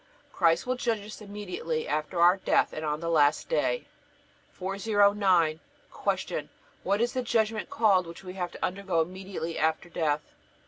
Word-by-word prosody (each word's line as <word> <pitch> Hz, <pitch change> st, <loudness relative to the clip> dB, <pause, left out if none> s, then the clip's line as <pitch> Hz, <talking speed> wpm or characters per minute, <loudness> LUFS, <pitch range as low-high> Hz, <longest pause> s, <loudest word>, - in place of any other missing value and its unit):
Christ 165 Hz, -1 st, +3 dB
will 255 Hz, -, 0 dB
judge 230 Hz, -6 st, -1 dB
us 215 Hz, +1 st, -10 dB
immediately 190 Hz, -6 st, -4 dB
after 155 Hz, +3 st, -2 dB
our 175 Hz, +3 st, +6 dB
death, -, -, +2 dB
and 155 Hz, -, -5 dB
on 150 Hz, 0 st, -2 dB
the 165 Hz, -, -2 dB
last 150 Hz, -2 st, +3 dB
day. -, -, 0 dB, 0.7 s
409. 195 Hz, -4 st, +2 dB, 0.3 s
Q. -, -, -2 dB, 0.3 s
What 200 Hz, +2 st, 0 dB
is 240 Hz, +1 st, +1 dB
the 255 Hz, -, 0 dB
judgment 225 Hz, -3 st, 0 dB
called 195 Hz, -6 st, +3 dB
which 170 Hz, +3 st, -10 dB
we 180 Hz, -1 st, -7 dB
have 180 Hz, -2 st, -3 dB
to -, -, -2 dB
undergo 185 Hz, -2 st, 0 dB
immediately 185 Hz, -1 st, -5 dB
after 160 Hz, +2 st, 0 dB
death? 150 Hz, -3 st, 0 dB
185 Hz, 155 wpm, -28 LUFS, 165-210 Hz, 0.7 s, our